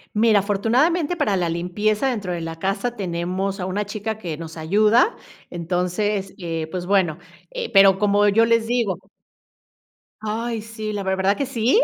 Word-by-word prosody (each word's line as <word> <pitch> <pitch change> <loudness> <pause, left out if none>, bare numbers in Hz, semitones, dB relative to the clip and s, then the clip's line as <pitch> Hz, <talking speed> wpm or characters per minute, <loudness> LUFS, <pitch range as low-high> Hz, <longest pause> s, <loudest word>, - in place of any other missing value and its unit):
Mira, 215 -1 +4
afortunadamente, 260 - +1
para 285 -11 +1
la 175 -2 0
limpieza 205 +8 0
dentro 205 -8 -3
de 170 - -4
la 165 0 -6
casa, 205 +7 -1
tenemos 190 +1 -2
a 180 - -2
una 190 +3 -1
chica 215 +1 -4
que 165 -7 -5
nos 165 0 -8
ayuda. 210 - +3 0.3
Entonces, 180 +3 -2
eh, 165 -3 -4
pues 180 +1 -4
bueno. 185 -5 +2 0.3
Eh, - - -5
pero 195 -1 +7
como 205 +1 +3
yo 220 +3 +4
les 230 -1 +2
digo 225 -7 0 1.2
Ay 225 +1 -3
sí, 220 -1 -6
la 205 -1 -3
ver 190 0 0
¿Verdad 195 +1 +2
que 280 - -1
sí? 255 - +2
205 Hz, 165 wpm, -22 LUFS, 180-225 Hz, 1.2 s, pero